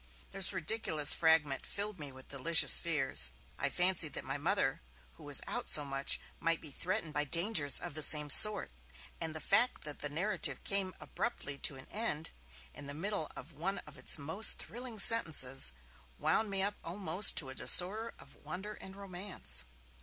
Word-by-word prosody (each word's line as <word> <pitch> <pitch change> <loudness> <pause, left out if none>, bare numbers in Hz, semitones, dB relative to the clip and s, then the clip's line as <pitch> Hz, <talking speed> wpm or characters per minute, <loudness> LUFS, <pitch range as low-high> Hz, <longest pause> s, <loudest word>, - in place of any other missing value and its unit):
This 195 -1 0
ridiculous 170 -5 +1
fragment 160 -4 0
filled 205 -2 -7
me 145 -2 -8
with 130 0 -16
delicious 155 +5 +7
fears; 135 - 0 0.3
I 135 - -1
fancied 175 -3 +1
that - - -7
my 135 +2 -6
Mother, 165 -3 -2 0.3
who 160 - -18
was 145 -2 +3
out - - -6
so 150 - +2
much, 135 0 0 0.2
might 165 0 -2
be 155 - -9
threatened 165 0 -5
by 150 - -2
dangers 165 -2 +1
of - - -9
the 155 - -7
same 150 -1 +4
sort; 210 - +9 0.5
and 160 -1 -5
the - - -4
fact 240 +10 +1
that 150 -1 -8
the 145 - -4
narrative 180 +9 -4
came 195 -2 -1
abruptly 140 -12 -6
to 140 - -2
an 130 - -14
end, 165 -8 -4 0.4
in 145 - -10
the 140 - -8
middle 195 0 -4
of - - -12
one 190 +6 -5
of 150 - -14
its - - -3
most 160 +9 +1
thrilling 240 -1 -9
sentences, 155 - +1 0.5
wound 165 +8 -2
me 195 -1 +1
up 205 +1 -2
almost 180 +2 0
to 135 - -1
a - - -8
disorder 210 +11 +2
of - - -18
wonder 195 +4 -9
and 190 -2 -13
romance. 185 - -4
165 Hz, 175 wpm, -31 LUFS, 145-195 Hz, 0.5 s, sort